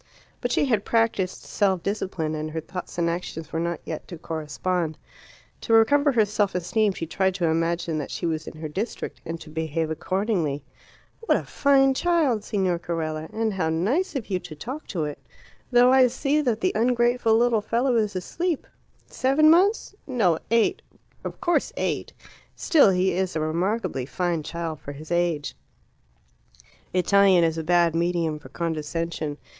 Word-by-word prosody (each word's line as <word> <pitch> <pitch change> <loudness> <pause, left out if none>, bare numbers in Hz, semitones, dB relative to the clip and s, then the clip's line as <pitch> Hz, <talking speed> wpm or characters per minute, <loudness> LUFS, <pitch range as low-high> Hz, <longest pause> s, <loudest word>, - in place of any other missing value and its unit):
But 245 - -1
she 285 - +2
had 225 -7 +1
practised 225 -5 0
self 190 -4 0
discipline, 185 -6 -2
and 155 0 -3
her 160 +1 -3
thoughts 180 +3 -7
and 170 -1 +1
actions 170 -2 -4
were 160 - 0
not 170 0 -2
yet 160 - -6
to 175 - -8
correspond. 160 +1 -3 0.6
To 225 - -1
recover 285 +6 +5
her 220 -3 +4
self 205 -2 0
esteem 200 +4 +1
she 165 - -4
tried 190 +3 0
to 180 -3 0
imagine 165 0 0
that 145 - -5
she - - -4
was 160 -2 -2
in - - -8
her 155 0 -5
district, 195 +10 -5
and 165 0 -5
to 155 - -12
behave 160 0 -2
accordingly. 175 -4 -1 0.6
"What 455 - +2
a - - -4
fine 270 -1 +3
child, 295 -8 +1
Signor 190 -5 0
Carella. 160 -2 -3
And 220 -1 -1
how 180 -4 0
nice 225 - 0
of 230 -6 -4
you 185 - +1
to 155 - -10
talk 255 - -7
to 170 -6 -2
it. 150 -1 -4 0.5
Though 245 +1 +6
I 260 -1 +6
see 275 +4 0
that 235 -6 0
the - - +2
ungrateful 240 0 +2
little 235 -2 +3
fellow 240 +4 +1
is 210 -3 +1
asleep! 330 - -2 0.4
Seven 285 +4 +3
months? 390 +7 +3
No, 200 - +2
eight; 230 0 +2 0.4
of - - -6
course 345 -1 +1
eight. - - -2 0.4
Still, 300 - +5
he 185 0 +2
is 185 0 -1
a - - 0
remarkably 165 - -1
fine 175 0 -1
child 165 0 -5
for 145 - -8
his 155 +3 -11
age." 170 -4 0 1.4
Italian 190 -1 +4
is 165 0 +1
a - - -3
bad 170 0 +3
medium 170 -2 0
for - - -13
condescension. 160 -1 -3
180 Hz, 170 wpm, -25 LUFS, 160-230 Hz, 1.4 s, Though